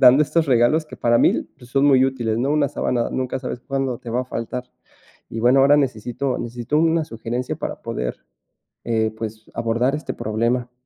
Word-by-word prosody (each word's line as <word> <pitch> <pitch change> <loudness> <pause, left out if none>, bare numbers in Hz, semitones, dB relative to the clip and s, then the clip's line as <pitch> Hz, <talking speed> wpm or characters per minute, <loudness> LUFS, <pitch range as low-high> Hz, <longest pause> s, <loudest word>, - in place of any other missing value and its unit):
dando 130 +3 +8
estos 160 +1 +1
regalos 135 +5 +3
que - - -10
para 120 0 +3
mí - - +3
son 130 +3 0
muy 130 -2 +6
útiles, 120 -4 -1
¿no?, 130 +4 0
una 150 -2 +2
sábana, 120 -4 -1
nunca 130 0 -2
sabes 125 -2 -5
cuándo 135 -2 -2
te 120 - -10
va 125 +2 +1
a - - -9
faltar, 125 +1 -4 0.7
y 115 - -4
bueno, 125 +3 +5
ahora 140 +2 +6
necesito 125 0 -1
necesito 120 +5 -2
una 165 0 +3
sugerencia 120 0 -4
para - - -5
poder, 60 0 -3 0.7
eh, 110 -2 0
pues, 110 -1 -7
abordar 115 +4 +1
este 150 - -4
problema. 120 +3 -1
125 Hz, 180 wpm, -22 LUFS, 115-135 Hz, 0.7 s, dando